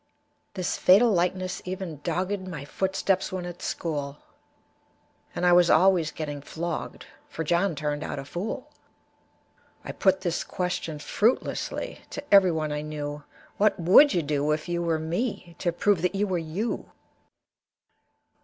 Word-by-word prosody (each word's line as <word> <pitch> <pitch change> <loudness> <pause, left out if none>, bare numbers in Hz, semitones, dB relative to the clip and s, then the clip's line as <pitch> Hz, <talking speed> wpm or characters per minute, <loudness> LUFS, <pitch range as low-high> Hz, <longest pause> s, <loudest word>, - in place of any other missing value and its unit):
This 185 -2 -2
fatal 215 +6 +6
likeness 185 0 0
even 180 -5 -6
dogged 185 +3 -2
My 150 -6 -6
footsteps 190 +3 0
when 185 -1 -4
at 175 0 -8
school, 145 -4 -3 1.2
And 180 - -1
I 175 - +6
was 175 -1 +6
always 175 -2 +4
getting 145 -3 -5
flogged, 165 +3 -5 0.2
For 160 - -4
John 175 +2 +1
turned 150 0 -2
out - - -4
a 135 - -5
fool. 220 - -5 1.1
I - - -4
put 190 -1 +2
this 175 -3 -1
question, 180 -4 -3
fruitlessly, 230 - -1
To 285 - -5
everyone 165 -6 +5
I 150 0 -2
knew, 150 -1 -5 0.4
"What 210 -1 +3
would 190 - +7
you 175 - +1
do, 145 0 0
if 155 +2 -4
you 175 0 -1
were 165 -2 +1
me, 170 +2 -3
To 175 - 0
prove 185 +1 +1
that 180 +2 0
you 200 +1 +1
were 185 -3 -1
you?" 170 +8 -3
175 Hz, 145 wpm, -26 LUFS, 155-190 Hz, 1.2 s, would